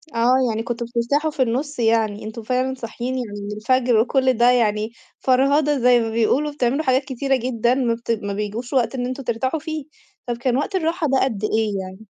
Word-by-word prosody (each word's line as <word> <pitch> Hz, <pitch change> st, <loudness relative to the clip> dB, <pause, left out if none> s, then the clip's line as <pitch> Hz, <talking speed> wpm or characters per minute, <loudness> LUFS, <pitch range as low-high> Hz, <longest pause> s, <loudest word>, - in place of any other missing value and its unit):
آه 240 Hz, +2 st, +4 dB
يعني 225 Hz, +1 st, -2 dB
كُنتم 235 Hz, 0 st, -3 dB
بترتاحوا 260 Hz, +7 st, 0 dB
في 290 Hz, -3 st, -3 dB
النُص 260 Hz, +4 st, -1 dB
يعني، 225 Hz, -2 st, +1 dB
أنتم 220 Hz, +1 st, -7 dB
فعلًا 255 Hz, +3 st, 0 dB
صاحيين 245 Hz, +1 st, -5 dB
يعني 215 Hz, -5 st, -5 dB
من 205 Hz, +1 st, -5 dB
الفجر 245 Hz, +1 st, +2 dB
وكلّ 260 Hz, +2 st, +2 dB
ده 240 Hz, +1 st, +5 dB
يعني 215 Hz, -2 st, +1 dB, 0.3 s
فرهدة 280 Hz, +3 st, +3 dB
زي 245 Hz, 0 st, +5 dB
ما 225 Hz, -1 st, -1 dB
بيقولوا، 240 Hz, +7 st, +1 dB
بتعملوا 275 Hz, +1 st, 0 dB
حاجات 260 Hz, -1 st, +2 dB
كتيرة 270 Hz, +1 st, 0 dB
جدًا 240 Hz, -1 st, 0 dB
ما 250 Hz, -3 st, +1 dB
بت 230 Hz, 0 st, -4 dB
ما 205 Hz, -3 st, -2 dB
بيجوش 210 Hz, +5 st, -4 dB
وقت 250 Hz, -1 st, +1 dB
إن 245 Hz, -, -2 dB
أنتم 255 Hz, +2 st, -4 dB
ترتاحوا 260 Hz, +6 st, -1 dB
فيه، 315 Hz, -2 st, -5 dB, 0.4 s
طب 240 Hz, -, -2 dB
كان 245 Hz, +1 st, 0 dB
وقت 340 Hz, +8 st, -2 dB
الراحة 330 Hz, -2 st, 0 dB
ده 270 Hz, -1 st, +2 dB
قد 220 Hz, -6 st, -2 dB
إيه 215 Hz, -2 st, 0 dB
يعني؟ 190 Hz, +3 st, -10 dB
245 Hz, 200 wpm, -21 LUFS, 225-265 Hz, 0.4 s, ده